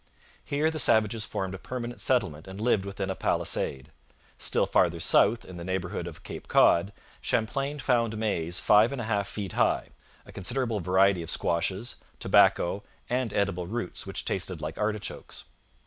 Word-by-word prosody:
Here 150 +3 0
the 155 - -4
savages 110 -3 +3
formed 95 -1 -3
a 95 - -6
permanent 120 +3 -6
settlement 95 - 0
and 95 +1 -8
lived 110 -3 +2
within 100 -1 -3
a - - -3
palisade. 65 -1 -1 0.5
Still - - +1
farther - - +2
south, 115 +3 +3
in 90 - -10
the 85 - -6
neighbourhood 95 -1 -3
of - - -10
Cape - - -8
Cod, 85 +4 +4 0.3
Champlain 135 +6 -1
found 120 -5 +1
maize 90 -6 -1
five 105 +5 +5
and 140 - -4
a - - -2
half 100 -2 0
feet 100 -4 -5
high, - - +1 0.4
a - - -13
considerable 115 +2 -2
variety 95 +1 +3
of 80 - -6
squashes, 95 +7 -1 0.2
tobacco, 95 +4 +3 0.3
and 125 -3 0
edible 95 -4 -1
roots 110 -2 -3
which - - -4
tasted 90 -2 -2
like 75 +1 -6
artichokes. 105 -2 -4
100 Hz, 165 wpm, -28 LUFS, 90-115 Hz, 0.5 s, five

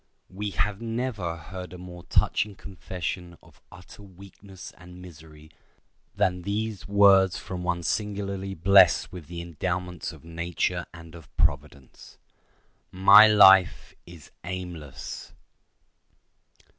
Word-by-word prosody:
We 105 +2 -5
have 105 +1 -2
never 115 -7 -3
heard 90 +2 -9
a - - -9
more 90 -1 -11
touching 105 0 +1
confession 90 -2 -7
of - - -22
utter 90 +3 -15
weakness 95 -1 -14
and 90 +1 -14
misery 80 -3 -15 0.6
than 95 -3 0
these 105 +2 -4
words 100 -2 +4
from 90 -1 -7
one 90 -1 -2
singularly 100 -1 -3
blessed 95 +1 +4
with 90 -5 -10
the 85 0 -7
endowments 90 +1 -4
of - - -16
nature 85 +1 -3
and 85 -2 -13
of 80 -4 -14
Providence: 70 -3 -3 0.7
"My 100 +3 +7
life 95 -4 +5
is 85 -4 -14
aimless." 85 -6 -8
90 Hz, 115 wpm, -25 LUFS, 85-100 Hz, 0.7 s, My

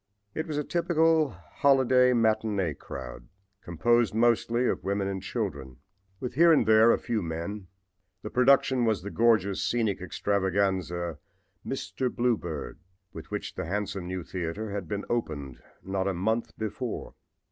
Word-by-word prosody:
It 160 - -3
was 150 -2 -3
a 150 - 0
typical 165 -2 +2
holiday 125 +6 +3
matinee 110 -7 +1
crowd, - - -9 0.3
composed 115 +6 +1
mostly 120 +1 +2
of - - -1
women 100 0 -1
and 95 -1 -3
children, 80 - -4 0.4
with 125 - -4
here 170 +5 +6
and 150 -8 +4
there 110 +2 +6
a - - +3
few 115 -3 -2
men. 85 +4 -5 0.6
The 105 - -6
production 130 0 +4
was 110 -5 0
the 100 - -5
gorgeous 110 -4 +2
scenic 110 -6 0
extravaganza 95 -4 -1 0.4
"Mr. 130 -1 -3
Bluebeard," 90 -11 -2 0.3
with - - -9
which - - -4
the - - -4
handsome 100 0 -3
new 90 -1 -4
theater 95 +5 -4
had 100 -4 -4
been 100 +4 -4
opened 75 - -3 0.2
not 95 0 -2
a 95 - -1
month 110 +6 -1
before. 110 +3 -4
105 Hz, 145 wpm, -28 LUFS, 95-120 Hz, 0.6 s, here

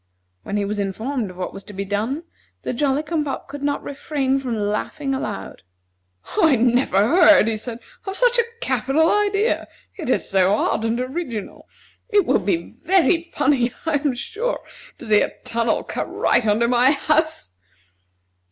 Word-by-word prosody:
When 200 - -3
he 205 - 0
was 205 +1 -3
informed 220 +4 -2
of 180 - -12
what 185 - -4
was 195 - -9
to 210 - -10
be 200 +1 -4
done, 220 - -2 0.4
the - - -2
Jolly 280 +3 +1
cum 310 0 -1
pop 280 -2 -5
could 280 0 -8
not 285 0 -1
refrain 275 -1 -1
from 250 -4 -3
laughing 215 +7 -2
aloud. 95 - -5 0.8
"I 315 -4 +5
never 245 -3 +2
heard," 315 -5 +6
he 225 - 0
said, 225 +2 -6 0.3
"of 385 - -3
such - - +3
a - - +5 0.2
capital 320 - +2
idea. 415 +2 +1 0.3
It 310 - -4
is - - +1
so 190 +1 +3
odd 220 +1 0
and 230 +1 0
original. 255 - -5 0.4
It 410 -5 +3
will - - +3
be 180 -3 -2
very 350 0 +3
funny, 275 -7 0
I 320 -2 +2
am 285 -3 -1
sure, 465 - -3 0.4
to - - -10
see 215 -2 +4
a - - -1
tunnel 230 -1 0
cut - - -4
right 230 - +2
under 215 +3 +3
my 245 +1 +4
house." 310 - 0
265 Hz, 170 wpm, -22 LUFS, 215-315 Hz, 0.8 s, heard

